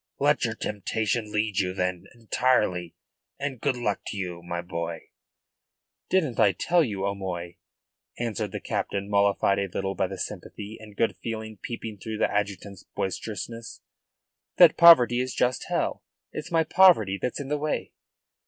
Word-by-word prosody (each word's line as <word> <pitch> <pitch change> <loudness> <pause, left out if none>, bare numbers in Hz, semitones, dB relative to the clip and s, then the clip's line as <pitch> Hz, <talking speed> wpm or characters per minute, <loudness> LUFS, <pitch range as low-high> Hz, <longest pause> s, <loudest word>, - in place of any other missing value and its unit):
Let - - +2
your - - -2
temptation 110 +2 -2
lead 105 -2 0
you 90 -1 -1
then, 90 -2 -2
entirely, 110 -7 +1 0.4
and 135 -4 -4
good 140 -3 0
luck 105 -4 -1
to 105 - -5
you, 90 -3 -4
my 85 0 -4
boy." 85 -1 -5 1.0
"Didn't 155 -11 +1
I 105 -3 +5
tell 175 - +2
you, 100 -7 -2
O'Moy," 90 -3 -4 0.6
answered 110 -3 -2
the - - -4
captain, 100 +1 -3
mollified 100 0 +3
a 100 - -1
little 95 +1 -3
by 95 - 0
the 95 +1 -7
sympathy 105 +3 -6
and 105 -2 -13
good 115 - +1
feeling 110 -1 -5
peeping 115 -3 -6
through 110 +2 -5
the - - +1
adjutant's 100 -1 -3
boisterousness, 110 +5 -5 0.8
"that 175 -3 +8
poverty 125 -8 +8
is 130 0 -2
just 125 -1 +1
hell. - - -1 0.3
It's 155 +3 -6
my 165 -2 +3
poverty 135 - +5
that's 125 - -2
in 140 -1 -5
the 150 0 0
way." 150 0 -2
105 Hz, 155 wpm, -26 LUFS, 95-120 Hz, 1.0 s, that